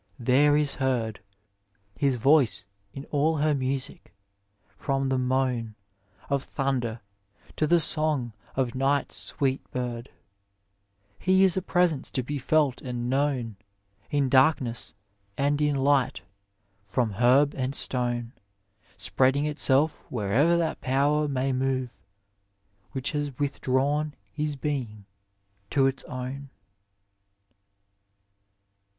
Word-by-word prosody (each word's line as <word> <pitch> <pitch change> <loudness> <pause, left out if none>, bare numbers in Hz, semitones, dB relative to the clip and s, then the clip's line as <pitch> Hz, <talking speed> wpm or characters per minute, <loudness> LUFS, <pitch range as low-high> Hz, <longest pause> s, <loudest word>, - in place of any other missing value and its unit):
there 140 +4 +4
is 150 -2 +1
heard 120 -5 0 0.8
HiB 140 -2 +2
voioe 125 -6 +3 0.3
in 135 +5 -8
all 155 +2 +2
her 150 +1 +2
miudo, 135 -1 -1 0.7
from 135 -1 -2
the 130 - +1
moan 125 -3 -1 0.5
i - - -4
Of 140 -1 0
thunder, 125 -5 -2 0.5
to 155 - +1
the 175 +2 +4
song 155 -7 +1 0.2
of 130 -2 0
ni^t's 135 +3 0
sweet 135 -1 0
bird; 125 0 -4 1.1
I - - -20
He 190 +1 +4
is 190 -3 +3
a 190 - 0
presenoe 175 -6 0
to 130 - -1
be 145 +3 -4
felt 145 -2 +1
and 125 -1 -3
known 130 -6 0
I 100 +7 -10
In 140 -2 +2
darknww 130 -2 +2 0.4
and 145 +1 +1
in 150 -1 +2
light, 135 -1 +2 0.6
from 110 +3 -1
herb 135 +4 +4
and 130 +1 -3
stone, 120 -2 0
I - - -33 0.6
Spreading 135 +3 +1
itself 150 0 +2
where'er 125 +10 +2
that 165 -2 -1
Power 145 +3 +1
may 135 -1 -1
more 130 -1 -1 1.0
Which 130 0 -2
has 145 -4 -3
withdrawn 145 +1 0 0.2
his 150 +4 -2
being 130 -8 -4 0.6
to 135 -2 +3
its 135 0 0
own. 130 +2 -6
135 Hz, 120 wpm, -26 LUFS, 125-145 Hz, 1.1 s, there